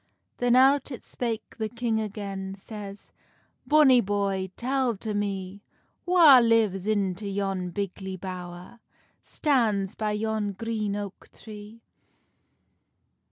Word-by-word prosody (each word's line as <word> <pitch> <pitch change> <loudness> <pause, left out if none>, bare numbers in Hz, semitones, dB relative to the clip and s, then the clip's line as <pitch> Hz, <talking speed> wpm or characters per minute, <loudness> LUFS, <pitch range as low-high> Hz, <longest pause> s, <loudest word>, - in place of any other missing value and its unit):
Then 245 0 +2
out 270 +2 +4
it 255 - -8
spake 230 -3 -5
the 220 -1 -2
king 235 -1 -1
again, 195 -2 -5
Says, 200 0 -10 0.6
"Bonny 290 -5 +6
boy, 195 -2 -1
tell 255 -2 0
to 215 +2 -4
me, 200 -1 -3 0.5
Wha 330 -7 +8
lives 220 -5 +2
into 200 -2 -1
yon 195 -2 -2
bigly 190 0 -5
bowr, 180 +3 -8 0.4
Stands 220 - 0
by 215 -1 -2
yon 215 -1 -2
green 215 0 -3
oak 205 -2 -7
tree?" 215 +1 -12
210 Hz, 115 wpm, -26 LUFS, 195-230 Hz, 0.6 s, Wha